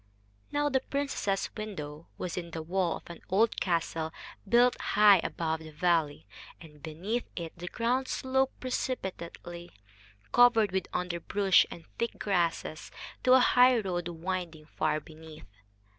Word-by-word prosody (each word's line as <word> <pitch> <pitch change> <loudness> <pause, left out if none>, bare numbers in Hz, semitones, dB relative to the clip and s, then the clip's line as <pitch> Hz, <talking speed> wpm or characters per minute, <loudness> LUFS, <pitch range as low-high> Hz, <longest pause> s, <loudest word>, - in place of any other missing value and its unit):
Now 290 0 +1
the 270 -2 +2
princess's 275 -8 -2
window 160 -8 -6
was 180 - -4
in 170 -2 -5
the 160 -1 -5
wall 175 0 0
of - - -16
an 170 - -10
old 215 +4 +2
castle 165 -2 -1 0.4
built 245 +2 +5
high 205 -2 +6
above 160 -1 -2
the 160 0 -10
valley, 155 - 0 0.3
and 150 -3 -15
beneath 180 +10 -3
it 165 -2 -6
the 175 +1 -8
ground 245 +5 0
sloped 265 +1 0
precipitately, 180 -8 -4 0.6
covered 225 -5 +5
with 190 0 -1
underbrush 180 +2 +2
and 165 - -10
thick 235 - -2
grasses, 170 -5 -1 0.3
to 255 - +6
a 260 - +8
highroad 225 -10 +4
winding 170 -2 -4
far 155 0 -1
beneath. 155 -3 -13
180 Hz, 135 wpm, -30 LUFS, 165-230 Hz, 0.6 s, a